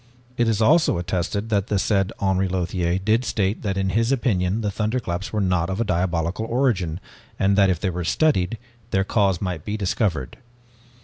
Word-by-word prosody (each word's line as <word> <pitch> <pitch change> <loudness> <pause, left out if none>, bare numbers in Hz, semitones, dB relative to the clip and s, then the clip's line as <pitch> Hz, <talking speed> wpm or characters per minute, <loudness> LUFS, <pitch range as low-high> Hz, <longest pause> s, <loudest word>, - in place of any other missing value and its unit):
It 120 -1 +1
is 110 0 +1
also 155 - +4
attested 90 +4 -2
that 100 -2 +1
the 105 - 0
said 95 -1 +1
Henri 95 -1 +1
Lothiere 90 -1 -1
did 110 +5 +1
state 105 -3 -1
that 100 -2 -2
in 95 0 0
his 115 +5 +1
opinion 105 -6 +1
the 105 -2 -1
thunderclaps 105 -3 -2
were 110 - -1
not 90 -3 +1
of 100 +5 -1
diabolical 90 +2 -1
origin, 110 - 0 0.4
and 100 +1 +2
that 100 -1 +4
if 90 -3 0
they 95 -1 -1
were 90 0 -3
studied, 100 - +1 0.3
their 95 -3 +1
cause 100 -3 +1
might 90 -5 -3
be 105 +1 -3
discovered. 95 - -1
95 Hz, 180 wpm, -23 LUFS, 90-110 Hz, 0.4 s, also